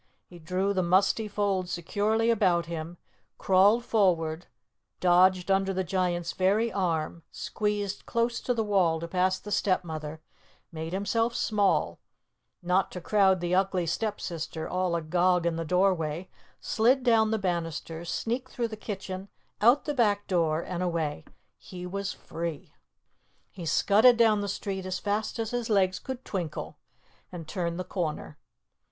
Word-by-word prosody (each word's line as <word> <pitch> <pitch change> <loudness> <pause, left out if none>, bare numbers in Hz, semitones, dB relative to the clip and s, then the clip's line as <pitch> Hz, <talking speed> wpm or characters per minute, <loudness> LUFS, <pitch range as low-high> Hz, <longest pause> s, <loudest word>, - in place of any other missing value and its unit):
He 175 - -14
drew 185 +4 -1
the 190 - +1
musty 190 +5 +2
folds 200 -3 -1
securely 215 +7 +1
about 185 -6 +2
him, 165 +1 -6 0.4
crawled 200 +5 +4
forward, 170 -7 +1 0.5
dodged 185 +1 +4
under 195 0 +1
the 190 - 0
Giant's 175 -1 -1
very 205 +5 +1
arm, 170 -3 -1
squeezed 205 -2 -3
close 235 0 0
to 245 - -1
the 225 - 0
wall 185 -6 +2
to 170 - -5
pass 185 +1 +1
the 210 - -10
Stepmother, 160 -6 -1 0.5
made 160 0 -5
himself 225 +5 0
small, 210 -4 +1 0.6
not 180 +2 +2
to 180 - -5
crowd 190 0 +3
the 175 0 -1
Ugly 190 -1 +1
Stepsister, 170 -4 -3
all 180 -1 0
agog 175 +2 +1
in 170 -1 +1
the 165 - -2
doorway, 180 -1 0 0.3
slid 250 +4 +2
down 225 -3 +4
the 220 - +1
banisters, 170 -3 -3
sneaked 250 +3 -2
through 235 -2 -2
the 220 - -6
kitchen, 195 -2 -6 0.3
out 240 +6 +5
the 295 - -1
back 205 -6 +2
door, 165 -4 +1
and 180 -1 -4
away. 165 - -2 0.3
He 180 -1 -9
was 200 +2 -3
free! 165 -3 -6 0.8
He 175 -3 -7
scudded 220 +9 +5
down 220 -3 +4
the 200 - -3
street 195 -1 -4
as 185 0 -2
fast 210 +2 -2
as 225 -1 -3
his 245 -2 -2
legs 185 -3 +2
could 260 -1 -7
twinkle, 170 -6 -4 0.5
and 170 -3 -8
turned 170 -2 -3
the - - -2
corner. 160 -5 -4
185 Hz, 150 wpm, -28 LUFS, 170-210 Hz, 0.8 s, out